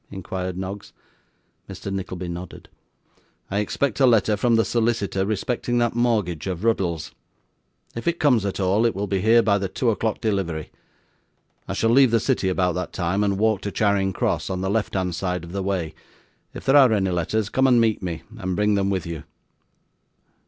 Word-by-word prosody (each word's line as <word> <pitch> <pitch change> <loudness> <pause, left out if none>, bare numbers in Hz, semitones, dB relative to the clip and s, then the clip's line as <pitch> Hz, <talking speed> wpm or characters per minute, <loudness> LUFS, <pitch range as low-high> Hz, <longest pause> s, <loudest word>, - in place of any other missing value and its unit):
inquired 95 -1 -5
Noggs. 95 +2 -6 0.8
Mr. 100 - -6
Nickleby 95 -2 -4
nodded. 85 0 -8 0.8
'I 100 - 0
expect 125 +5 -1
a 135 - +6
letter 110 -3 +3
from 115 +3 +2
the 115 - +3
solicitor 110 -5 0
respecting 120 +3 -1
that 120 -1 +1
mortgage 105 -9 0
of 90 0 -4
Ruddle's. 90 -9 -1 0.8
If 115 - -6
it 170 0 0
comes 125 -8 +3
at 100 -1 -3
all, 100 +5 +2
it 115 - -2
will 100 +1 -2
be 100 -2 -1
here 115 +2 +5
by 100 -2 +2
the 95 - -2
two 120 +3 0
o'clock 110 0 -2
delivery. 95 -8 -2 1.0
I - - -3
shall 115 - +1
leave 135 +1 +6
the 115 0 +3
city 110 -5 0
about 90 -1 +1
that 90 0 -4
time 95 +3 0
and 100 -1 0
walk 110 -1 +1
to 100 - -4
Charing 100 -2 +1
Cross 95 - -1
on 95 -1 -3
the 95 +1 -1
left 110 -1 -1
hand 90 -2 -1
side 90 +1 -2
of 85 - -9
the 100 +1 -3
way; 95 -5 -2 0.6
if - - -10
there 135 +2 +5
are 130 -4 +7
any 95 -3 +1
letters, 95 +5 -1
come 130 +2 +2
and 125 -2 +5
meet 110 -2 +2
me, 85 -4 -4 0.2
and 95 -1 -2
bring 105 +1 +2
them 100 -1 +1
with 95 -4 -1
you. 85 -3 -6
100 Hz, 195 wpm, -23 LUFS, 95-115 Hz, 1.0 s, are